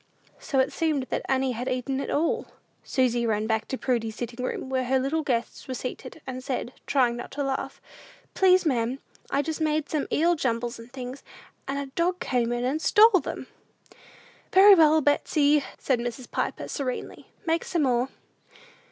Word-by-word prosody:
So 275 - -3
it 265 +1 +2
seemed 310 -4 0
that - - -1
Annie 265 -1 +2
had 245 +1 -3
eaten 255 +1 -2
it - - -4
all. 315 +3 0 0.4
Susy 245 -3 +1
ran 215 -1 0
back 220 -1 -1
to 265 - -3
Prudy's 230 -4 -1
sitting 240 +2 -5
room, 255 - -3
where 260 -1 -1
her 265 +2 +2
little 275 +5 0
guests 245 -5 -2
were 260 - -4
seated, 255 +5 -7
and 255 -1 -6
said, 255 -1 -3
trying 250 -4 +2
not 240 - -7
to 285 +1 -2
laugh, 270 -1 -3 0.5
"Please, 370 -1 +4
ma'am, 250 -3 0 0.3
I 280 - +1
just 320 +1 -4
made 310 -1 0
some 300 -3 -1
eel 340 +3 +3
jumbles 240 -6 -2
and 230 +1 -12
things, 255 +1 -7 0.5
and 275 +1 -2
a 280 - -2
dog 355 +4 0
came 240 -6 0
in 240 0 -1
and 290 +5 -1
stole 425 0 +6
them." - - -6 1.1
"Very 395 +2 +9
well, 315 -3 +6
Betsey," 290 0 +3
said 260 -3 0
Mrs. 240 +1 -5
Piper, - - -2
serenely; 260 -4 -5 0.2
"make 330 0 +1
some 335 -4 0
more." 250 -1 +1
265 Hz, 180 wpm, -26 LUFS, 245-305 Hz, 1.1 s, Very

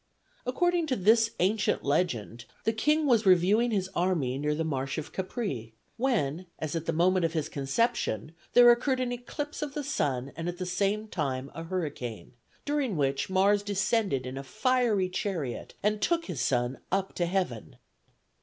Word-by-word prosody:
According 345 +5 +1
to 260 - +1
this 225 +2 +4
ancient 200 +3 +1
legend, 125 - -1 0.2
the 225 - +1
king 300 +8 +2
was 235 -6 +4
reviewing 190 +6 +5
his 195 -4 0
army 165 -9 0
near 150 +1 0
the 160 - -1
marsh 135 -4 -2
of 155 - -5
Capræ, 185 - -4 0.2
when, 185 - 0
as 155 0 -4
at 165 -1 -3
the - - +2
moment 180 +3 +3
of 165 -1 +1
his 155 -3 -1
conception, 140 - -1 0.2
there 240 0 +9
occurred 255 +2 +1
an 250 -1 -1
eclipse 285 +5 -5
of 295 -2 -4
the 295 - -2
sun 140 - -1
and 165 +1 -3
at 175 - -5
the 185 - -3
same 200 +4 0
time 135 -8 -3
a 165 - -6
hurricane, 145 - -4 0.3
during 285 - 0
which 135 +1 0
Mars 200 +2 +3
descended 195 - 0
in 130 +1 -5
a - - -6
fiery 215 - +1
chariot 180 - -4
and 210 0 +1
took 335 +7 +1
his 165 -9 -4
son 125 0 0
up 195 0 0
to 175 - 0
heaven. 175 - -2
185 Hz, 175 wpm, -29 LUFS, 145-225 Hz, 0.3 s, there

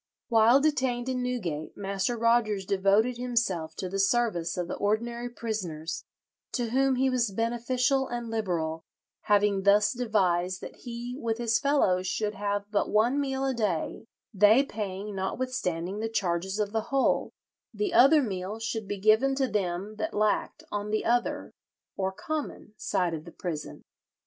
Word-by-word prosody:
While 230 +3 +5
detained 260 -5 +1
in 255 -1 -1
Newgate, 185 -12 -3
Master 200 +3 -1
Rogers 225 -4 +2
devoted 200 +5 +2
himself 230 -10 -1
to 185 - -4
the 195 +2 -3
service 195 -5 +1
of 175 -1 -2
the - - -4
ordinary 235 +4 -1
prisoners, 170 -9 -4 0.5
to 240 -3 -1
whom 265 +1 +3
he 265 +1 +2
was 250 -3 +1
"beneficial 245 +5 0
and 240 -1 -4
liberal," 165 -7 -2 0.4
having 205 -1 +3
thus 205 +1 +4
devised 185 -7 +1
"that - - -9
he 240 0 -6
with 225 -3 -1
his 235 -1 +1
fellows 190 -11 +2
should 210 +2 -1
have 205 -1 -2
but 205 - +1
one 235 +6 +3
meal 270 -1 -1
a 265 - +1
day, 210 -2 -2 0.3
they 210 +6 +6
paying, 205 -5 -5
notwithstanding, 190 -3 -2
the 225 +1 -2
charges 190 -2 -1
of 210 -1 -1
the 220 0 -1
whole; 275 -1 +2 0.4
the 405 -4 -2
other 295 0 +7
meal 195 -1 -4
should 225 -2 -4
be 205 - -3
given 220 +7 +4
to 265 -1 +1
them 200 -1 -2
that 320 - -2
lacked 210 0 0
on 205 0 -3
the 215 0 -1
other 240 +1 0 0.4
(or 190 0 -1
common) 290 -1 -5
side 180 -4 -1
of 155 -1 -5
the 170 - -11
prison. 160 -4 -6
215 Hz, 160 wpm, -28 LUFS, 190-245 Hz, 0.5 s, other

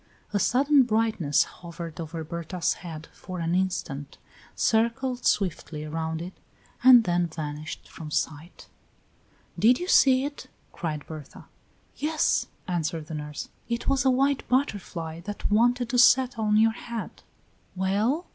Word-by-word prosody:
A 205 - +2
sudden 275 +7 +4
brightness 220 - +2
hovered 170 -2 -9
over 165 0 -5
Berta's 170 +2 -2
head 160 -3 -8
for 185 -1 -8
an 165 0 -1
instant, 180 -7 -2 0.4
circled 245 +3 +1
swiftly 165 -5 -1
around 160 +1 -3
it, 180 +2 -8 0.5
and 250 -2 +9
then 175 -2 +1
vanished 155 -1 -6
from 155 -2 -9
sight. 155 +2 -4 0.9
"Did 245 +3 +5
you 355 - -4
see 265 -6 +5
it?" 285 0 -7 0.3
cried 155 -4 -4
Berta. 155 -3 -10 0.5
"Yes," 305 +1 +1 0.2
answered 165 -3 -2
the - - -5
nurse, 150 -1 -6 0.2
"it 235 0 -2
was 275 0 +2
a 265 - +4
white 275 +2 +2
butterfly 185 - -1
that 205 +4 -5
wanted 240 +3 +3
to 245 - +2
settle 245 -2 +5
on 210 0 +3
your 225 +1 +5
head." 230 0 -7 0.5
"Well?" 210 - 0
190 Hz, 135 wpm, -26 LUFS, 160-245 Hz, 0.9 s, and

